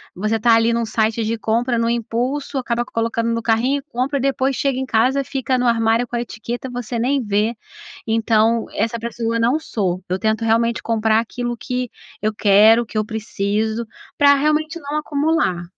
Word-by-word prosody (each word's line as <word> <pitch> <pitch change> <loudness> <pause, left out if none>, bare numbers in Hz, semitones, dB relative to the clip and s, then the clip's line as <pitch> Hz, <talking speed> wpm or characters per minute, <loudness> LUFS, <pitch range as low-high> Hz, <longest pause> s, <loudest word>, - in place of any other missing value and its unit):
você 215 +4 0
tá 230 +1 +4
ali, 230 +1 +3
num 235 0 0
site 220 +1 0
de 225 +1 -1
compra, 235 +3 0
num 230 0 +1
impulso 245 +5 -2
acaba 240 -1 -1
colocando 230 0 -1
no 230 - -1
carrinho 235 +5 +1
e - - -13
compra 270 +3 -1
e - - -3
depois 270 0 0
chega 275 -1 0
em 265 - -2
casa, 255 +3 +2
fica 260 -1 -1
no 250 - 0
armário 230 0 +2
com 240 - -5
a - - -1
etiqueta 240 +2 -6
você 245 -1 -4
nem 265 +3 +1
vê. 210 +2 0 0.5
Então 225 0 +2
essa 230 +1 -1
pessoa 230 0 -2
não 240 +6 +2
sou, 185 - -2
eu 185 +1 -1
tento 220 +2 0
realmente 230 +1 +1
comprar 220 -1 +2
aquilo 240 +1 -4
que 250 +1 -3 0.3
eu 215 - +1
quero, 215 +3 +5
que 220 - -6
eu 215 - +1
preciso, 220 +1 -2 0.3
pra 285 -1 +6
realmente 305 +3 0
não 290 -1 -4
acumular. 300 - 0
230 Hz, 185 wpm, -20 LUFS, 220-255 Hz, 0.5 s, pra